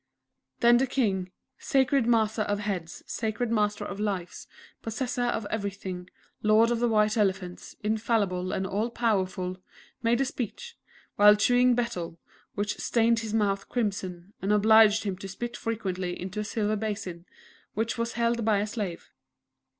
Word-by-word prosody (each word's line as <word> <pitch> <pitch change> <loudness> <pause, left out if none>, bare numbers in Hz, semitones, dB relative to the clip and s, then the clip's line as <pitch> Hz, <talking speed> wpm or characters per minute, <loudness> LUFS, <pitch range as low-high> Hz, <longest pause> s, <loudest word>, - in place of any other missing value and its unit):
Then 240 0 +7
the 265 +2 +2
King, 195 -8 0 0.3
"_Sacred 265 -2 +2
Master 220 -2 +2
of 205 -1 0
Heads, 185 -5 -4
Sacred 225 +1 -2
Master 210 -2 +1
of 195 - -6
Lives, 195 -4 -3 0.3
Possessor 245 +2 -2
of 225 -3 -1
Everything, 195 -4 -4 0.3
Lord 215 +2 +4
of 235 - 0
the 240 - +2
White 215 -1 +2
Elephants, 190 -3 -1
Infallible, 210 -4 0
and 190 - -1
All 205 +5 -1
Powerful_," 190 -6 -1 0.4
made 235 +1 +2
a 270 - +2
speech, 370 - -5 0.4
while 210 0 +8
chewing 245 +3 +4
Betel, 180 -9 -3 0.4
which 205 +1 -2
stained 230 -1 +2
his 220 -1 -3
mouth 200 -2 0
crimson, 195 -5 -3
and 195 - 0
obliged 215 0 +6
him 195 -3 -3
to 195 - -6
spit 235 +5 -5
frequently 185 -5 -3
into 190 +3 -5
a - - -1
silver 215 0 -1
basin, 200 -5 -4 0.5
which 225 +1 -1
was 230 0 -1
held 235 0 0
by 215 -1 +3
a 205 - 0
slave. 205 -5 -5
210 Hz, 150 wpm, -27 LUFS, 195-230 Hz, 0.5 s, while